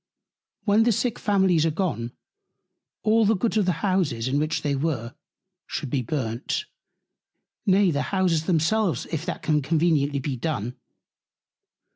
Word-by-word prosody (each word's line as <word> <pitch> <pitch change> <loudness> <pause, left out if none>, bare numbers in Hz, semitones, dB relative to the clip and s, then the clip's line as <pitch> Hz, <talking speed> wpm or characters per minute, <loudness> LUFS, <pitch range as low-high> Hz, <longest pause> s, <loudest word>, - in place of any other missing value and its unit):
When 210 +1 +4
the 235 +1 +4
Sick 230 +2 -1
Families 190 -6 +3
are 165 - +2
gone, 150 -9 -2 0.9
all 220 +1 +4
the 220 +1 +3
Goods 220 +3 0
of 205 -4 +2
the 175 +1 0
Houses, 165 - 0
in 140 +2 +1
which 155 +1 -1
they 145 -1 0
were, 135 -5 -2 0.5
should 145 -5 -4
be 140 - +1
burnt; 120 - -2 1.0
nay 195 -1 +4
the 145 -2 0
Houses 180 -5 +1
themselves, 180 +3 +1
if 160 +1 -3
that 180 - -4
can 155 -1 +2
conveniently 150 -1 +1
be 135 0 -2
done. 125 -4 -3
160 Hz, 145 wpm, -25 LUFS, 140-190 Hz, 1.0 s, When